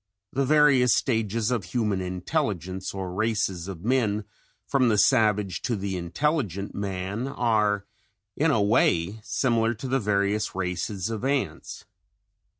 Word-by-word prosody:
The 135 +1 +1
various 140 -4 +5
stages 115 -1 0
of 120 -5 0
human 105 0 -1
intelligence 95 - -2
or 95 -2 -5
races 95 -4 -1
of 95 -1 -7
men 110 -4 +1 0.4
from 130 -3 +2
the 105 - +2
savage 105 -3 +3
to 120 - -1
the 100 -1 -3
intelligent 100 - -1
man 100 +4 -3
are 105 -6 +1 0.5
in 160 +3 +2
a 110 -9 +3
way 100 -1 +2
similar 115 0 +1
to 125 +5 -6
the 135 +1 +1
various 100 -1 0
races 95 +2 -2
of 110 +1 -4
ants. 130 - -2
105 Hz, 135 wpm, -26 LUFS, 95-120 Hz, 0.5 s, various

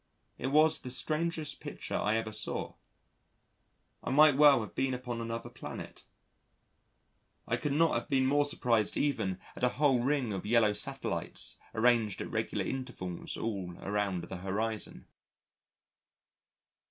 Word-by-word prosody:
It 125 - -2
was 155 +3 +4
the 130 - -6
strangest 155 +4 -1
picture - - -7
I 105 - +1
ever 110 -1 -3
saw. 110 - -3 1.3
I - - -3
might 150 +1 +6
well 145 -3 +7
have 110 - -7
been 135 -1 0
upon 125 -2 -4
another 115 0 -5
planet; - - -8 1.4
I - - +1
could 145 - -2
not 165 +2 +3
have - - -2
been 135 -2 +3
more 145 +2 +3
surprised 115 -6 +1
even 110 -11 0 0.2
at - - -8
a 125 - +5
whole 140 -4 +4
ring 130 -4 0
of 95 - -4
yellow 110 -1 +4
satellites - - -3 0.2
arranged 115 -3 +3
at - - -5
regular - - -1
intervals 125 -10 -5
all 95 -6 -4
around 100 -3 -1
the 95 - -6
horizon. 105 +4 -3
120 Hz, 140 wpm, -31 LUFS, 105-140 Hz, 1.4 s, well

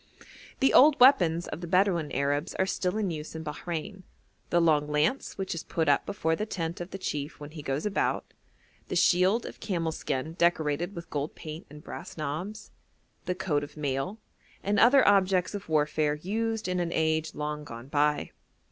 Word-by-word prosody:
The 270 - +4
old 290 +2 +7
weapons 175 - +5
of 165 - -6
the 175 - -5
Bedouin 180 -3 +2
Arabs 145 +4 -1
are 190 - +2
still 185 +1 -1
in 205 -4 0
use 155 0 -6
in 160 - -5
Bahrein: 170 +5 -5 0.5
the 175 - +3
long 155 -3 +3
lance 150 - 0
which 195 -1 -2
is 165 - -4
put 160 -2 -2
up 145 - +3
before 160 -5 0
the 215 +5 -3
tent 170 -4 -4
of 175 - -6
the 195 - -6
chief 150 -5 -4
when 145 0 -9
he 155 -1 -8
goes 140 +3 -2
about, 210 - 0 0.6
the - - -3
shield 190 +6 +3
of - - -8
camel 170 -6 -1
skin 155 0 -3
decorated 170 +1 +1
with 170 -1 -8
gold 145 +1 -3
paint 155 +3 -8
and 150 +1 -12
brass - - -8
knobs, 160 +8 -5 0.5
the 180 0 -1
coat 170 -6 0
of 145 - -10
mail, 140 +6 -2 0.5
and 205 +1 +1
other 255 +3 +6
objects 190 -2 +3
of 200 -4 -6
warfare 150 -1 +1
used 220 +6 -2
in 180 0 -1
an 175 -1 0
age 160 -1 0
long 150 0 -3
gone 120 -3 -9
by. 150 +1 +1
165 Hz, 185 wpm, -28 LUFS, 150-190 Hz, 0.6 s, old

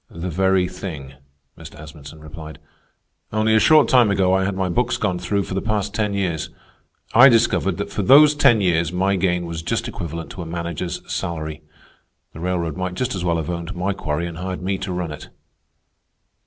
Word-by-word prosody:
"The 85 +2 -6
very 95 +1 +2
thing," 80 -7 -8 0.4
Mr. 80 -1 -12
Asmunsen 75 0 -12
replied. 75 0 -10 0.7
"Only 110 +1 +1
a 110 - +5
short 155 +5 +5
time 125 -4 +5
ago 95 -2 +2
I 95 0 +2
had 100 -1 -2
my 95 -1 -1
books 125 +8 0
gone 95 -4 -1
through 100 +3 -1
for - - -7
the 95 - -1
past 105 -2 -2
ten 105 -2 -1
years. 90 -6 -2 0.6
I 130 +4 +9
discovered 115 -2 +2
that - - -5
for - - -2
those 150 +3 +7
ten 120 -7 +4
years 85 -3 +1
my 95 +2 +1
gain 90 -2 0
was 85 -1 -5
just 85 - -2
equivalent 85 0 -6
to 90 - -8
a - - -6
manager's 85 +1 -4
salary. 80 -2 -4 0.7
The - - -10
railroad 85 -3 -2
might 95 -1 -3
just 125 +5 -2
as 95 -3 -4
well 85 -1 +1
have 80 +1 -3
owned 85 -1 -5
my 95 +3 -1
quarry 80 -3 -3
and 85 -1 -7
hired 90 0 -5
me 95 +1 -1
to 95 0 -4
run 90 -3 -3
it." 75 - -9
90 Hz, 195 wpm, -21 LUFS, 85-100 Hz, 0.7 s, I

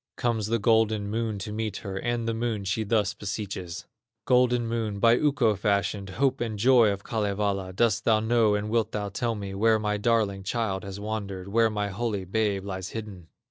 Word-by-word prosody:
Comes 115 -4 0
the 115 +1 +1
golden 110 -2 +2
Moon 110 -1 -1
to 100 +2 -6
meet 110 -2 -3
her, 95 -1 -4
And 120 +3 -2
the 115 - 0
Moon 115 -2 -2
she 95 +3 -1
thus 105 -2 +1
beseeches: 95 -4 -5 0.4
"Golden 125 -1 +3
Moon, 115 -3 -2
by 115 +3 +5
Ukko 135 -6 +2
fashioned, 100 -1 0
Hope 135 -3 +1
and 110 -3 -2
joy 120 0 +5
of 100 -1 -3
Kalevala, 100 -3 -1
Dost 105 +2 +1
thou 110 -2 +4
know 110 -1 +3
and 105 +1 -3
wilt 115 -1 +1
thou 105 -1 -2
tell 115 +3 -2
me 100 -2 -6
Where 110 +3 +3
my 105 -1 -1
darling 105 -3 +1
child 100 -1 -2
has 100 0 -7
wandered, 100 -3 -5
Where 115 +2 +3
my 105 -1 -2
holy 105 -1 -2
babe 100 0 0
lies 95 -1 -5
hidden?" 105 -6 -7
105 Hz, 190 wpm, -27 LUFS, 100-115 Hz, 0.4 s, by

